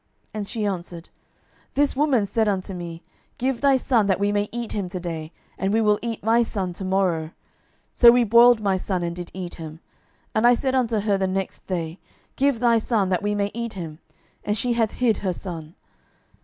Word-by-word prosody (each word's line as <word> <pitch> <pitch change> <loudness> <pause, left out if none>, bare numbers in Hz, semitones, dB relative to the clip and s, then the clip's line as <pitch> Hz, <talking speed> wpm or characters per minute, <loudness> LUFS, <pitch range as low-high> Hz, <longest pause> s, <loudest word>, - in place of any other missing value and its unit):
And 210 -2 -4
she 215 -1 -3
answered, 175 -3 -5 0.7
This 285 0 +2
woman 270 -6 +2
said 220 +2 0
unto 195 -1 -1
me, 170 -1 -7 0.3
Give 255 -1 -1
thy 275 -2 +5
son, 240 -5 +2
that 190 -2 +1
we 200 0 +1
may 205 0 0
eat 240 -1 -4
him 195 -3 -3
to 185 0 -5
day, 165 -3 -5 0.3
and 195 +1 0
we 220 - +3
will 210 -2 +3
eat 230 -2 -4
my 225 +2 +4
son 195 -6 -2
to 190 - -7
morrow. 185 -4 +1
12:006:029 155 - -12 0.6
So 240 - +8
we 245 0 +4
boiled 235 +1 +6
my 195 -2 +1
son, 185 -1 -2
and 170 0 -3
did 175 -1 -7
eat 180 -2 -5
him: 160 -1 -9 0.5
and 220 +2 +4
I 245 - +6
said 260 +2 -1
unto 235 -5 +1
her 205 0 +1
on 195 - +1
the 190 - +1
next 190 0 -4
day, 170 -1 -3 0.4
Give 275 -3 +1
thy 235 -1 +4
son, 215 -4 0
that 180 -2 +1
we 205 0 -1
may 200 0 -1
eat 235 0 -4
him: 165 -5 -7 0.4
and 210 +1 -1
she 245 +3 0
hath 225 -2 0
hid 240 -3 +1
her 185 -2 -2
son. 165 -3 -8
205 Hz, 215 wpm, -23 LUFS, 180-235 Hz, 0.7 s, So